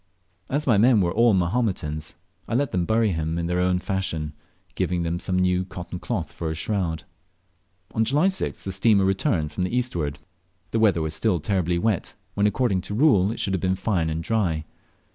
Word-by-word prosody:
As 145 +3 -1
my 115 -6 +4
men 120 0 +5
were 85 -3 +2
all 115 0 +4
Mahometans, 85 -6 -1 0.3
I 115 - -2
let 140 +1 +1
them 90 -2 0
bury 110 +2 +2
him 80 -1 -2
in 85 - -1
their 90 +1 0
own 90 0 +2
fashion, 90 -5 -2 0.4
giving 90 -1 -1
them 85 +1 -2
some 90 0 -1
new 90 0 +2
cotton 90 -1 -7
cloth 95 -7 -3
for 80 - -4
a 80 - -3
shroud. 85 -1 -2 0.9
On 110 - +2
July 140 +9 +2
6th 190 -1 -1
the 95 - -3
steamer 100 +1 +3
returned 95 - 0
from 75 - -4
the 90 +7 0
eastward. 85 - -2 0.5
The 115 - +1
weather 100 -7 +3
was 80 0 -1
still 90 +3 +1
terribly 90 +1 0
wet, 105 0 -1 0.2
when, 100 +1 +2
according 105 -3 +1
to 105 - -2
rule, 110 -8 +4
it 115 - -6
should 100 -4 -1
have 95 - -1
been 95 0 +1
fine 95 -4 0
and 80 +1 -3
dry. 85 -7 0
95 Hz, 200 wpm, -24 LUFS, 85-110 Hz, 0.9 s, men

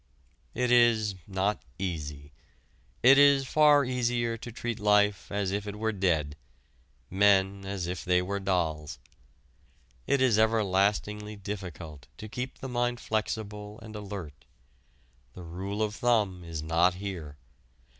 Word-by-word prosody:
It 125 0 0
is 115 -4 +4
not 100 +1 -1 0.2
easy. 75 -6 -5 0.7
It 135 +3 +8
is 140 -1 +6
far 150 0 +5
easier 120 -2 0
to 115 +1 -8
treat 115 0 -4
life 105 -1 +2
as 100 -2 -1
if 100 +1 -3
it 105 - -5
were 110 +1 -1
dead, 80 -7 0 0.8
men 100 0 +3
as 95 -3 -3
if 90 +1 -4
they 90 0 +3
were 100 +2 -2
dolls. 85 -6 -1 1.1
It 140 - +2
is 125 -5 +3
everlastingly 105 -1 +1
difficult 90 -8 -7
to 110 - -8
keep 125 +4 -5
the 135 - -7
mind 120 -1 -1
flexible 105 -1 -4
and 110 -1 -10
alert. 100 -8 -8 0.9
The 90 - -10
rule 95 +5 -4
of 105 -1 -2
thumb 105 -7 +1
is 80 -2 -6
not 85 +3 +2
here. 90 -7 -6
100 Hz, 135 wpm, -28 LUFS, 90-110 Hz, 1.1 s, It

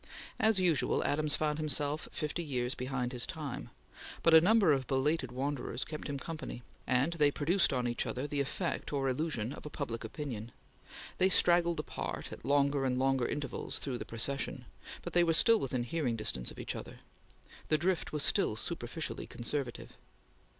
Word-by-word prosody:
As 220 -3 +4
usual, 175 -6 +2
Adams 150 0 +1
found 150 0 0
himself 150 0 -1
fifty 155 +3 -2
years 125 -4 -1
behind 125 -1 -2
his 120 -1 0
time, 150 -5 -5 0.5
but 165 - +5
a 160 - +10
number 200 -1 +5
of 135 -3 +1
belated 135 0 +1
wanderers 130 -1 -2
kept 155 -1 -6
him 140 - -2
company, 155 -4 -6 0.2
and 130 +6 +2
they 150 -3 +4
produced 170 +6 +2
on 125 -2 0
each 120 - -1
other 130 +3 -2
the 145 0 -2
effect 170 +6 -2
or 140 -2 0
illusion 130 -3 -1
of - - -9
a 150 - -6
public 120 -7 -4
opinion. 115 -2 -5 0.7
They 185 - +5
straggled 175 -2 +4
apart, - - -4
at - - -10
longer 140 0 +3
and 125 -1 +1
longer 130 -1 +2
intervals, 145 -3 -3
through 130 -4 -3
the - - -3
procession, 135 +5 -3 0.4
but - - -6
they 175 - +5
were 165 -1 +3
still 230 +6 +6
within 130 -5 -1
hearing 125 -2 -1
distance 105 - -3
of - - -11
each - - -4
other. - - -8 0.7
The 155 - +3
drift 180 +2 0
was 150 -1 -1
still - - +2
superficially - - -3
conservative. 125 0 -4
145 Hz, 175 wpm, -33 LUFS, 125-160 Hz, 0.7 s, a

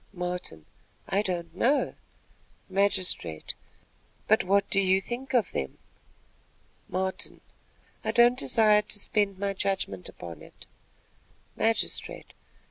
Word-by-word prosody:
Martin. 180 - -4 0.4
"I 195 +1 +2
don't 175 -4 -3
know." 265 +9 +2 0.7
Magistrate. 185 - 0 0.7
"But 220 - +5
what 200 +2 +3
do 195 - +4
you 190 0 +4
think 255 +6 -4
of 235 -5 +3
them?" 65 - -3 1.1
Martin. 190 +1 -2 0.6
"I - - -2
don't 240 +1 +6
desire 210 - +4
to 210 - -3
spend 205 -1 +1
my 200 0 -1
judgment 190 - -2
upon 85 -3 -9
it." - - -14 0.9
Magistrate. 225 0 -1
195 Hz, 110 wpm, -28 LUFS, 180-210 Hz, 1.1 s, don't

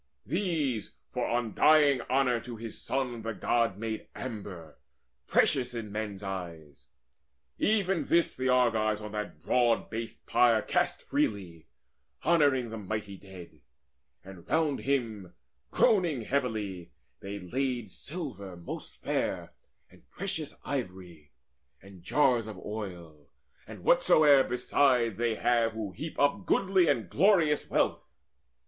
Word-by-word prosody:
These, 150 - -1
for - - -2
undying 135 +4 +4
honour 130 -2 +2
to 120 +1 -8
his 115 -1 -7
son, 125 -3 -2
The 115 0 -4
God 115 -4 +1
made 110 0 -4
amber, 100 - -7 0.5
precious 125 -2 +2
in 110 -3 -5
men's 105 -2 -4
eyes. 85 -7 -7 0.7
Even 195 -4 +1
this 170 0 +2
the 130 0 -1
Argives 110 -4 +2
on 105 -1 -7
that 105 0 -5
broad 120 -2 +2
based 115 0 -6
pyre 115 -3 +4
Cast - - 0
freely, 90 -6 -2 0.6
honouring 140 -8 +3
the 115 - -5
mighty 105 0 -4
dead. 95 -2 -13 0.6
And 95 -3 -12
round 155 -3 +1
him, 115 -9 -2 0.3
groaning 170 - +2
heavily, 105 -9 -2 0.3
they 100 +1 -6
laid 120 +2 -3
Silver 110 - -7
most 85 - -8
fair - - -2 0.4
and - - -21
precious - - -4
ivory, 90 -5 -5 0.5
And 95 -1 -15
jars 120 - +2
of 105 -3 -7
oil, 85 -9 -7 0.4
and - - -10
whatsoe'er 145 -3 +5
beside 125 -3 +2
They 115 -1 0
have 115 -1 +2
who 110 -3 -4
heap 155 - -7
up 170 +7 +1
goodly 190 -3 +3
and 120 -9 +1
glorious 165 - +3
wealth. - - 0
115 Hz, 125 wpm, -29 LUFS, 100-135 Hz, 0.7 s, whatsoe'er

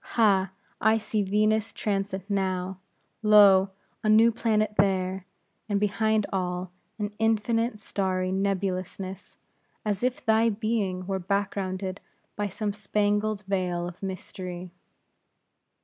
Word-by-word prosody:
Ha! 195 -4 +4 0.3
I 220 +1 +4
see 215 -1 -1
Venus' 215 +2 +1
transit 195 -2 -2
now; 190 -2 -1 0.4
lo! 200 -3 +7 0.3
a 215 - +1
new 225 +2 +6
planet 215 -2 +1
there; 190 -1 +1 0.4
and 200 -1 +1
behind 215 +1 +1
all, 180 -1 -2 0.3
an 210 -1 -3
infinite 225 +1 +1
starry 185 -3 -1
nebulousness, 190 -1 -3 0.5
as 205 -2 -1
if 255 +3 -1
thy 225 0 +4
being 205 -4 -1
were 190 0 -2
backgrounded 190 0 -2 0.3
by 205 0 -1
some 205 +1 -3
spangled 210 0 0
vail 180 -3 -1
of 175 0 -10
mystery." 185 -2 -6
200 Hz, 115 wpm, -27 LUFS, 190-215 Hz, 0.5 s, lo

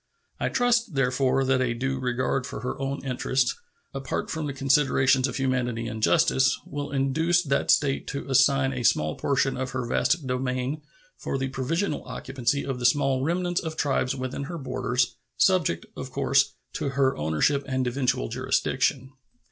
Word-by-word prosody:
I - - 0
trust, 235 -7 +1
therefore, 130 0 +2
that 130 0 +2
a 120 -2 0
due 135 +2 -2
regard 125 +1 -1
for - - -6
her 125 +2 -4
own 135 0 -3
interests, 130 0 0 0.4
apart 135 -1 -3
from 155 -3 -3
considerations 135 -1 +3
of 125 - -5
humanity 125 -3 -1
and 110 -1 -5
justice, 135 -1 +3
will 145 0 -5
induce 160 +6 +2
that 140 -2 0
State 135 -2 +2
to 140 - -5
assign 135 0 +3
a 125 - -3
small 75 -9 +2
portion 135 -1 0
of 130 0 -3
her 130 -2 -2
vast 155 +6 +1
domain 130 +3 -2 0.4
for - - -3
the 135 0 -2
provisional 150 +7 -2
occupancy 130 +1 -2
of 135 -2 -3
the 125 - -3
small 135 -2 +2
remnants 175 +3 0
of 160 -2 -5
tribes 135 -3 0
within 130 +1 -4
her 170 +3 -6
borders, 125 -3 -1 0.2
subject, 145 - +2
of 130 - -6
course, 135 +1 +2 0.2
to 150 -3 -2
her 135 -1 +1
ownership 80 - +1
and 130 -1 -1
eventual 125 0 0
jurisdiction. 130 +1 0
135 Hz, 165 wpm, -26 LUFS, 125-140 Hz, 0.4 s, considerations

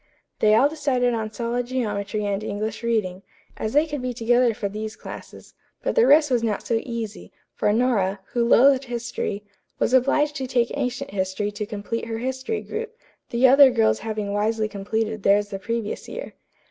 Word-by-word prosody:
They 215 0 +5
all 265 +6 +5
decided 255 -5 0
on 220 -2 -3
solid 240 +2 -2
geometry 210 -4 -2
and 200 0 -1
English 215 +1 -4
reading, 215 -6 -1 0.4
as 215 - -3
they 295 +2 +4
could 295 -4 -5
be 250 -1 -3
together 240 +1 +3
for 205 - -2
these 215 +2 -5
classes, - - -11 0.3
but - - 0
the 470 -1 +4
rest 295 -1 +5
was 245 -2 +3
not 220 -3 -2
so 230 -1 +1
easy, 230 -3 -6 0.2
for 210 - +1
Nora, 210 -4 +1
who 240 - +2
loathed 265 +3 +5
history, 235 -4 -4 0.3
was - - 0
obliged 285 +3 +3
to 265 - -3
take 240 -2 +1
ancient 270 0 -3
history 190 +1 -2
to 205 0 -5
complete 210 +3 -4
her 225 -1 -4
history 260 - -3
group, 460 +1 -6 0.3
the 245 +2 +4
other 275 +1 +8
girls 110 - +2
having 215 -2 -3
wisely 215 +1 0
completed 215 +1 -3
theirs 205 +1 +3
the 195 - -5
previous 230 +1 -4
year. - - -7
230 Hz, 180 wpm, -23 LUFS, 210-255 Hz, 0.4 s, other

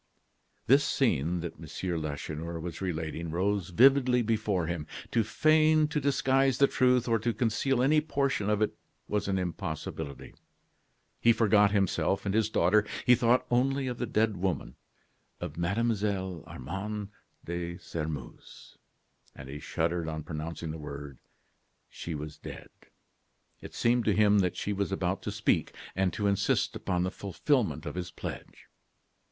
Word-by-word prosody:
This 140 +4 +5
scene 90 - +1
that 85 - -6
M. 85 -3 -4
Lacheneur 75 +2 -4
was 85 +2 -6
relating 80 -2 -3
rose 95 +2 0
vividly 125 +4 +5
before 105 -5 0
him. 80 -2 -4 0.2
To 115 - +3
feign, 155 +7 +4
to 150 -1 -1
disguise 135 -1 +2
the 140 - +6
truth, 125 -2 +2
or 115 -1 +2
to 120 +3 0
conceal 120 +3 +1
any 150 +3 +4
portion 140 -8 0
of 105 0 +2
it - - 0 0.3
was 105 -1 -1
an 95 -1 +1
impossibility. 80 -5 -5 0.9
He 115 - +5
forgot 105 -2 +4
himself 95 -2 +1
and 100 - 0
his 110 0 +2
daughter; 105 +1 +3 0.2
he 125 - +7
thought 120 +1 +3
only 135 +3 +2
of 125 -2 -4
the 120 - -1
dead 110 -2 +1
woman, 90 -9 -2 0.6
of 75 - -5
Mlle. 100 -1 -1
Armande 100 +9 -5 0.4
de 85 0 -4
Sairmeuse. 75 -7 -7 0.6
And 65 0 -10
he 70 +2 -6
shuddered 85 +2 -1
on 80 -1 -4
pronouncing 80 0 -5
the 80 - -7
words: 70 -2 -8 0.7
"She 85 - -6
was 75 +1 -7
dead." - - -9 0.9
It - - -10
seemed 120 0 +2
to 105 - +3
him 105 -1 +5
that 90 -3 0
she 105 - -2
was 100 -3 -2
about - - -1
to - - -4
speak, - - 0 0.2
and 95 -1 +1
to 105 - -2
insist 100 -1 +1
upon 90 -2 -1
the 90 - -1
fulfilment 110 - 0
of - - -4
his 90 -1 -4
pledge. - - -8
100 Hz, 150 wpm, -29 LUFS, 85-120 Hz, 0.9 s, he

